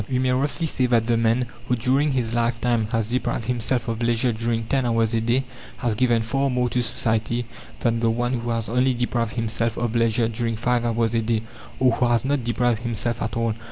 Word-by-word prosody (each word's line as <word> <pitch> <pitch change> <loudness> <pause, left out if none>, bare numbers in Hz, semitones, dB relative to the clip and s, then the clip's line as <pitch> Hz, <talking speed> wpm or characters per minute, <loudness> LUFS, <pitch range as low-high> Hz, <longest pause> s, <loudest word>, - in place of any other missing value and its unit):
We 130 - 0
may 130 0 +1
roughly 140 +6 0
say 130 -5 +1
that 115 -2 +2
the 120 0 +2
man, 115 +2 +2 0.2
who 125 - +2
during 135 +5 +1
his 120 -3 -1
lifetime 120 -1 +1
has 115 -2 0
deprived 125 -2 -1
himself 120 +1 -1
of 115 0 -3
leisure 120 +1 +2
during 115 +1 -1
ten 135 +4 0
hours 115 -1 +1
a 115 - +1
day 120 +4 +1 0.3
has 120 -3 0
given 120 0 +2
far 135 +4 0
more 125 -1 +1
to 125 - 0
society 115 +1 -1 0.4
than 115 -1 +1
the 115 0 +2
one 120 +2 0
who 120 -1 -2
has 115 -1 -1
only 125 +2 +2
deprived 120 -2 -1
himself 115 0 -1
of 120 -1 -1
leisure 115 0 +2
during 115 0 -2
five 120 +1 0
hours 115 0 +1
a 115 - +2
day, 110 0 0 0.4
or 130 -1 +4
who 120 +2 +1
has 120 +1 +2
not 140 -2 0
deprived 120 -1 +1
himself 120 0 -2
at 110 +1 -2
all. 115 -1 +1
120 Hz, 220 wpm, -23 LUFS, 115-125 Hz, 0.4 s, or